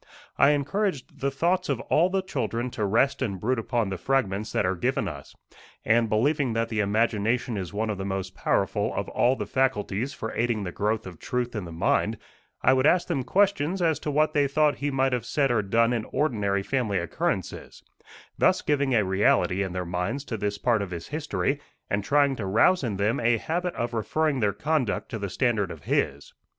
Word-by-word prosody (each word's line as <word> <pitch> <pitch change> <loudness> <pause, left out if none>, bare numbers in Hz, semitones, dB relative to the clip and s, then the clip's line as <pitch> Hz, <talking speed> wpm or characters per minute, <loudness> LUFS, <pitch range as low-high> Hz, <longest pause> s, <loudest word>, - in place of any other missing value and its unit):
I 140 - +5
encouraged 145 +2 -1
the 140 - 0
thoughts 170 +7 0
of 135 -4 0
all 170 +8 +2
the 190 0 0
children 120 - -3
to 105 - -2
rest 130 +8 +2
and 100 -7 -2
brood 125 +5 0
upon 115 -2 -1
the 95 -2 -4
fragments 110 -4 0
that - - +1
are 95 +1 +1
given 85 - -1
us, - - -8 0.5
and, 115 0 +3
believing 130 +4 +1
that 115 0 -1
the 110 -1 -2
imagination 110 +3 +1
is 95 -4 -4
one 110 +1 -1
of 100 - -5
the - - -3
most 95 -1 -3
powerful - - 0
of - - -2
all 125 +2 +2
the 105 - -4
faculties 125 0 0
for 110 - -6
aiding 115 -3 0
the 90 - -4
growth 110 +4 -1
of 90 -3 -9
truth 125 -1 -2
in 105 -4 -3
the 85 - -8
mind, 80 - +1 0.5
I 130 - +5
would 130 +2 +3
ask 180 +2 +3
them 150 -6 0
questions 190 0 +1
as 165 -3 +1
to - - -4
what 155 +1 +2
they 145 -1 +3
thought 150 +1 +2
he 145 - -1
might 135 -1 +1
have 125 -3 -1
said 135 +1 +1
or 115 -3 +2
done 115 +4 +2
in 115 -2 -2
ordinary 105 -9 0
family 115 -5 0
occurrences, 85 -2 -3 0.6
thus - - +3
giving 140 -3 +1
a 105 -3 +3
reality 95 0 +2
in 95 -2 -2
their 90 -1 -3
minds 90 +10 -2
to 115 -6 -4
this 105 0 -2
part 115 -1 +1
of 100 - -4
his 85 -2 -7
history, 145 -1 -2 0.3
and 100 0 0
trying 140 +3 +3
to 100 - -4
rouse 140 - +3
in 110 -6 -2
them 105 +3 +1
a 115 0 +3
habit 175 +8 -2
of 120 0 -3
referring 140 +5 0
their 105 -3 +2
conduct 125 +2 -1
to 110 - -4
the 100 -1 -3
standard 110 -3 0
of 80 -4 -9
his. 70 +1 -1
115 Hz, 210 wpm, -26 LUFS, 100-140 Hz, 0.6 s, I